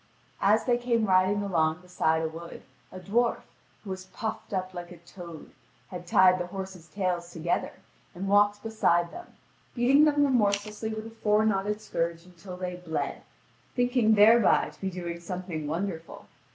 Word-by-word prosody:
As 210 +3 +3
they 240 -1 +2
came 235 -2 +1
riding 190 +1 +3
along 160 -3 +1
beside 160 -3 0
a - - 0
wood, 165 +2 -9 0.3
a 185 - -8
dwarf, 230 +6 0 0.4
who 200 - -7
was 185 0 -6
puffed 220 +3 -5
up 185 -1 -3
like 175 -1 -7
a 175 - -10
toad, 170 -1 -11 0.4
had 180 -1 -8
tied 185 +1 +5
the 175 - -3
horses' 190 -3 -7
tails 175 -1 -2
together, 170 +1 -2 0.4
and 190 +3 -4
walked 205 +1 +3
beside 175 -6 +1
them, 355 - -11 0.4
beating 265 +5 +5
them 290 -1 +3
remorselessly 215 -3 0
with 220 0 -5
a 225 - -9
four 215 -1 +2
knotted 210 0 0
scourge 170 -3 -3
until 180 +1 -11
they 180 -1 -4
bled, 175 -3 -4 0.5
thinking 245 -3 +3
thereby 220 +1 +5
to - - -22
be 195 - -1
doing 175 -2 -5
something 170 -3 -5
wonderful. 165 +1 -4
190 Hz, 165 wpm, -28 LUFS, 175-215 Hz, 0.5 s, tied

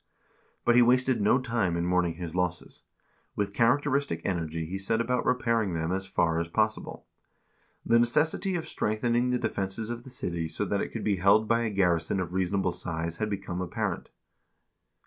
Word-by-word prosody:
But 120 - +5
he 125 - +6
wasted 125 0 +3
no 105 +5 +4
time 115 -9 -1
in 85 - -1
mourning 90 -2 +1
his 85 -1 -6
losses; 90 -1 -2 0.5
with 100 -1 -2
characteristic 135 - +1
energy 85 -3 -2
he 95 +4 -5
set 110 +4 +1
about 125 +2 0
repairing 115 -7 +1
them 80 +1 -2
as 95 +1 -2
far 80 -3 +1
as 85 - -2
possible. 110 +5 -2 0.8
The 115 0 +4
necessity 155 - +2
of 165 - -3
strengthening 120 +3 0
the 125 - +1
defenses 100 +1 -3
of 120 0 -5
the 130 - -12
city 85 -9 -3
so - - -3
that - - -1
it - - -3
could - - -6
be 100 -2 +1
held 100 +4 +4
by 115 +1 +2
a - - 0
garrison 90 -3 +1
of 90 -1 -4
reasonable 95 0 0
size 85 -1 -3
had 110 -1 -2
become 95 -3 -4
apparent. 90 -2 -3
100 Hz, 180 wpm, -28 LUFS, 90-120 Hz, 0.8 s, he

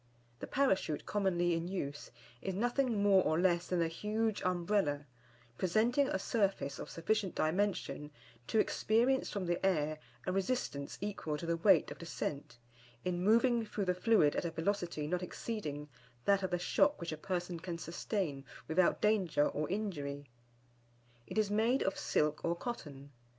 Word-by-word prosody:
The - - -6
Parachute 190 - +1
commonly 175 -4 +1
in 165 +1 -1
use 150 -6 -4 0.3
is 190 -1 -3
nothing 240 0 +1
more 195 -2 +6
or 155 - +1
less 175 -1 +2
than 180 -2 +1
a - - +1
huge 215 +5 -1
Umbrella, 175 -5 0 0.5
presenting 230 +9 +3
a 295 - 0
surface 195 - 0
of - - -6
sufficient 195 +3 -1
dimension 175 -3 0 0.4
to - - 0
experience 235 +5 +2
from 200 -3 -3
the 175 +1 -1
air 155 -5 +1 0.3
a 185 - 0
resistance 190 - -2
equal 195 -7 -3
to 170 - -6
the 170 0 +1
weight 195 +4 +4
of - - -8
descent, 145 -6 -5 0.5
in 180 -1 -1
moving 235 +3 +4
through 210 -2 -3
the 180 - +2
fluid 180 -5 +3
at - - 0
a 170 - -1
velocity 170 -2 -2
not 180 +4 -1
exceeding 170 -6 -4 0.4
that 200 -1 +4
of 190 - -1
the 180 - 0
shock 285 +11 +2
which 170 -1 -4
a - - -2
person 175 0 -3
can 170 0 -5
sustain 165 -3 -3 0.2
without 170 +3 +2
danger 190 -9 +3
or 150 +1 -3
injury. 145 - -3 1.0
It - - -6
is 210 -2 +2
made 225 +5 +2
of 195 - 0
silk 150 0 0
or 170 0 +1
cotton. 145 - -7
185 Hz, 160 wpm, -34 LUFS, 160-210 Hz, 1.0 s, more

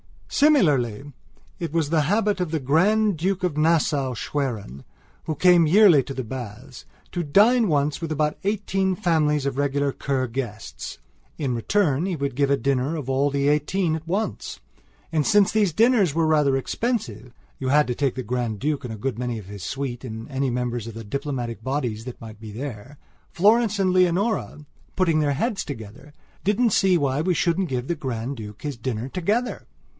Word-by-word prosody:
Similarly 145 - +2 0.5
it 165 -3 -4
was 160 -3 +1
the 160 -3 +3
habit 205 +4 +1
of 180 -2 -1
the 160 0 -1
Grand 190 +8 +2
Duke 185 +3 -1
of 180 -5 0
Nassau 150 -5 +2
Schwerin, 110 - -4 0.4
who 155 - -2
came 175 0 +5
yearly 180 -4 +6
to 135 - -7
the 130 - -4
baths, 120 +1 -8 0.3
to 175 - -2
dine 215 - +4
once 145 -2 0
with 165 -1 -4
about 150 0 0
eighteen 195 -2 0
families 155 -6 +1
of 135 -1 -2
regular 140 0 +1
Kur 135 -1 -1
guests. 115 - -6 0.4
In 135 -5 -1
return 155 - +1
he 185 - -1
would 140 -4 -3
give 140 0 +2
a 140 - +3
dinner 135 +4 0
of 145 -5 -5
all 135 +2 +2
the 140 0 0
eighteen 155 +4 +1
at 160 0 -8
once. 200 +6 -3 0.5
And, 155 -3 +1
since 205 -2 +4
these 205 -6 +2
dinners 220 - +3
were 165 -1 +2
rather 150 -4 +3
expensive 130 - -3 0.3
(you 130 - -3
had 150 +3 +4
to 125 - -2
take 135 0 -1
the 130 - -4
Grand 120 -2 -2
Duke 145 0 -1
and 115 - -5
a - - -7
good 120 +1 -3
many 120 -2 -2
of 105 - -8
his 100 -2 -8
suite 135 -3 -4
and 110 -1 -7
any 135 0 0
members 120 -2 -2
of 115 - -8
the 115 - -7
diplomatic 120 -1 -4
bodies 120 -4 -3
that 125 - -8
might 110 -2 -10
be 110 -1 -9
there)Florence 150 - -1
and 190 -1 +2
Leonora, 185 -2 +1 0.3
putting 170 -4 +2
their 145 -2 +1
heads 215 - -1
together, 120 +3 -9 0.3
didn't 215 +4 +2
see 190 -2 +4
why 140 -2 0
we 180 +2 +1
shouldn't 175 +2 +1
give 125 -1 -3
the 170 - -1
Grand 130 -2 -4
Duke 105 -2 -9
his 145 -4 -4
dinner 115 0 -3
together. 205 - -2
145 Hz, 185 wpm, -24 LUFS, 125-180 Hz, 0.5 s, yearly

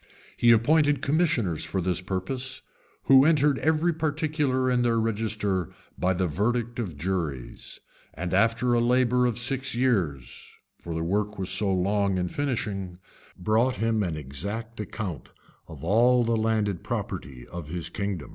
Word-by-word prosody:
He 120 - +5
appointed 145 +6 +3
commissioners 140 - +1
for 95 - -2
this 90 -1 -1
purpose, 110 +9 -4 0.4
who 135 0 +7
entered 150 -3 +3
every 160 +2 +2
particular 150 -4 0
in 125 -1 +2
their 115 -1 +2
register 105 -5 -1 0.3
by 95 +1 +1
the 95 +1 0
verdict 115 +8 -1
of 90 -11 -4
juries; 80 -6 -4 0.4
and 90 +2 -4
after 115 +5 +2
a 120 - +3
labor 125 0 +3
of 120 - -2
six 130 +1 0
years, 95 - -1 0.2
(for 85 -1 -6
the 80 - -2
work 105 +4 -1
was 95 -1 -3
so 100 -2 +1
long 100 +1 +1
in 90 -1 -1
finishing,) 100 -10 -3 0.4
brought 110 +7 +2
him 115 -1 0
an 85 -6 -2
exact 100 - -5
account 100 - -5 0.4
of 80 -3 -11
all 120 +7 +4
the 115 0 +1
landed 110 -4 0
property 65 -2 -5
of 85 -4 -7
his 85 0 -4
kingdom. 100 -6 -4
110 Hz, 150 wpm, -26 LUFS, 90-125 Hz, 0.4 s, who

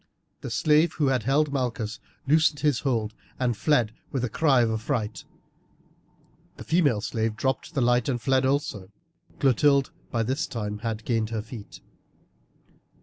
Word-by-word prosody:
The - - -5
slave 155 +2 +3
who 145 -4 +1
held 135 +4 +1
Malchus 115 -5 -2 0.3
loosed 155 0 +3
his 145 -5 +2
hold 115 -6 -1 0.2
and 125 -2 0
fled 120 -3 +2 0.2
with 130 -3 -2
a 125 - 0
cry 135 +1 +3
of 115 -1 +2
affright, 110 -1 -3 1.3
the - - -8
female 150 -11 +2
slave 110 0 -2
dropped 135 +7 -2
the 135 - +1
light 120 +1 +2
and 125 -2 0
fled 130 +2 +2
also. 130 -8 -1 0.5
Clotilde 140 +1 +3
had - - -36
by 115 -2 0
this 135 +8 -1
time 105 -5 -4 0.2
gained 115 -3 0
her 110 -2 -3
feet. 110 -2 -10
125 Hz, 145 wpm, -26 LUFS, 110-145 Hz, 1.3 s, slave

